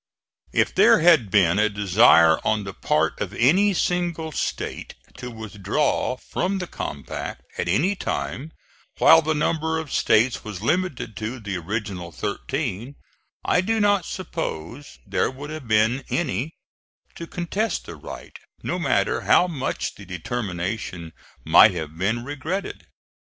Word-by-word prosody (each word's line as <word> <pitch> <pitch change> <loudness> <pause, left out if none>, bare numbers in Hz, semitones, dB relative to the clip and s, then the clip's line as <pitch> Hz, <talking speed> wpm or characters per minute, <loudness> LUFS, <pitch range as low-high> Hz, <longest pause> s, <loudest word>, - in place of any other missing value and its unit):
If - - +1
there - - +5
had 160 - +5
been 95 -1 +3
a 105 0 +3
desire 95 -5 +5
on 110 -1 +1
the 95 -1 -7
part - - 0
of - - -4
any 185 +12 +4
single 175 -3 -1
State - - -4 0.2
to 125 0 -6
withdraw 110 +4 -1
from 190 +8 -2
the 185 - -3
compact 70 - -6 0.2
at 90 - -1
any 145 - +2
time 155 -4 -4 0.5
while 160 0 +7
the 160 0 -1
number 160 +1 0
of 160 -4 -5
States 120 +3 +2
was 105 -3 -7
limited 155 - -1
to 110 +4 -4
the 100 -3 -5
original 95 -1 -4
thirteen, 105 - -4 0.5
I 180 - +3
do 225 +4 0
not 205 -4 +3
suppose 145 - -6
there - - 0
would 140 +3 -8
have 155 -5 -7
been 110 +4 +2
any 160 -2 -2 0.6
to 170 - -8
contest 190 +7 -2
the - - -8
right, - - -10 0.3
no - - -2
matter - - +1
how - - +4
much 150 -7 -3
the 100 - -13
determination 90 -3 -4 0.3
might - - +7
have 80 0 -5
been 105 +7 -1
regretted. 155 +8 -5
125 Hz, 140 wpm, -23 LUFS, 100-160 Hz, 0.6 s, while